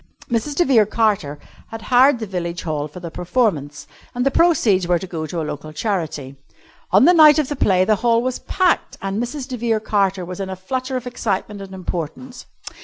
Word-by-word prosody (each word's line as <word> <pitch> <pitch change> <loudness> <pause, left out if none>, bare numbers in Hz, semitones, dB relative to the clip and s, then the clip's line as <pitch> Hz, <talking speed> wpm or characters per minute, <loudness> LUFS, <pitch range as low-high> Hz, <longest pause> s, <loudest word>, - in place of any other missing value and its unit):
Mrs. 235 +5 -1
de 350 - +3
Vere 230 -8 +4
Carter 210 -10 0 0.3
had 225 0 -9
hired 255 +2 +4
the 225 - -5
Village 175 -3 -4
Hall 150 -3 -2
for 155 +4 -11
the 170 -2 -7
performance, 165 - -1 0.3
and 245 +1 -1
the 275 - +3
proceeds 240 - +3
were 175 0 +3
to 190 - -6
go 160 -3 -5
to 170 +1 -4
a - - -2
local 150 +1 -6
charity. 155 -7 -3 0.5
On 200 +7 +5
the 355 - +6
night 310 -3 +7
of 300 -4 0
the 290 - -2
play 185 -7 +2
the 215 0 +2
Hall 230 +1 +2
was 255 0 -2
packed, 365 -2 0
and 195 +3 -3
Mrs. 255 +2 -5
de 255 -2 -5
Vere 225 -1 0
Carter 195 -3 0
was 180 +1 -7
in 195 -1 -4
a 190 - -4
flutter 255 +7 -3
of 250 - -7
excitement 210 -4 -3
and 190 -1 -9
importance. 185 - -6
205 Hz, 210 wpm, -20 LUFS, 175-250 Hz, 0.5 s, night